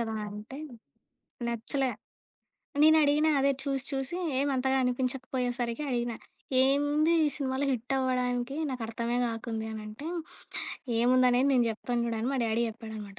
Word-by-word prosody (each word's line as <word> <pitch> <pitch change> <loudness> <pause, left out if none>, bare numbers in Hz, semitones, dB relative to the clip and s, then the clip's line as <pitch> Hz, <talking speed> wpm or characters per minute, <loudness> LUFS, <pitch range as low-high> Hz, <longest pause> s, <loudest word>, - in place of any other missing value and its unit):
కదా" 225 -1 -2
అంటే 210 +6 -8 0.9
నచ్చలే. 250 +3 -1 0.9
నేను 315 0 +7
అడిగిన 295 +2 +3
అదే 275 0 +4
చూసి 275 -1 -1
చూసి 270 +4 -2 0.2
ఏమంతగా 265 -1 +1
అనిపించకపోయేసరికి 250 -1 -1
అడిగిన. 240 -1 0 0.5
"ఏముంది 290 +4 +3
ఈ - - +4
సినిమాలో 265 -1 -1
హిట్టవ్వడానికి? 250 +1 0
నాకర్థమే 235 -1 -2
కాకుంది" 225 -1 -4
అనంటే, 215 +6 -7 0.9
ఏముందనేది 250 +2 +4
నేను 250 -2 +4
జెప్తాను 240 +2 -2
చూడు 230 - -1
అని 235 - 0
మా - - 0
డ్యాడీ 225 +1 +1
జేప్పాడనమాట. 220 -3 -7
250 Hz, 120 wpm, -29 LUFS, 230-270 Hz, 0.9 s, నేను